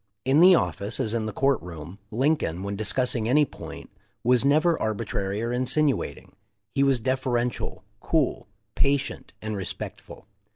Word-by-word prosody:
In 135 +3 +4
the 180 +2 +8
office, 105 -8 -1
as 110 - 0
in 110 -2 -1
the - - -3
court 135 +4 +1
room, 85 +2 -9
Lincoln, 120 - 0
when 100 0 -3
discussing 115 +2 +1
any 150 +3 +5
point, - - -10 0.3
was 125 0 +4
never 155 +4 +3
arbitrary 105 -1 -2
or 120 - -1
insinuating. 130 +4 -1 0.4
He 140 - +1
was 135 -2 +3
deferential, 125 -1 -1 0.2
cool, - - 0 0.3
patient, 140 -1 0
and 110 -1 -3
respectful. 95 -3 -6
125 Hz, 140 wpm, -26 LUFS, 105-140 Hz, 0.4 s, the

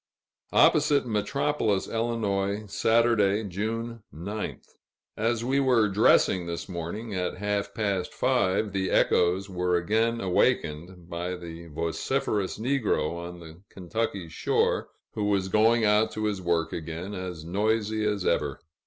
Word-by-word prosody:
Opposite 145 -2 +4
Metropolis, 110 -1 0
Ill., 105 -3 -1
Saturday, 110 -1 +3
June 115 +4 -4
9th. 100 +8 -5 0.5
As 115 +1 0
we 135 +2 +2
were 125 -5 +4
dressing 95 -3 +3
this 85 0 -4
morning, 95 +5 -5
at 90 -1 -2
half 100 0 -1
past 100 -4 -1
five, 110 -5 +1
the 95 -1 0
echoes 90 +3 +2
were 90 -2 0
again 110 +6 +1
awakened 90 -2 0
by 90 +1 -4
the 85 -1 -9
vociferous 85 +5 -1
negro 110 - 0
on 85 +1 -7
the 80 +1 -12
Kentucky 100 -1 -3
shore, 80 - 0 0.3
who 105 - -2
was 100 -2 +1
going 110 +2 +4
out 105 +1 +4
to 110 - -2
his 100 -3 -1
work 85 -2 0
again, 85 +5 -5
as 90 -4 -6
noisy 110 +4 0
as 105 -3 -1
ever. - - 0
100 Hz, 130 wpm, -27 LUFS, 90-110 Hz, 0.5 s, Opposite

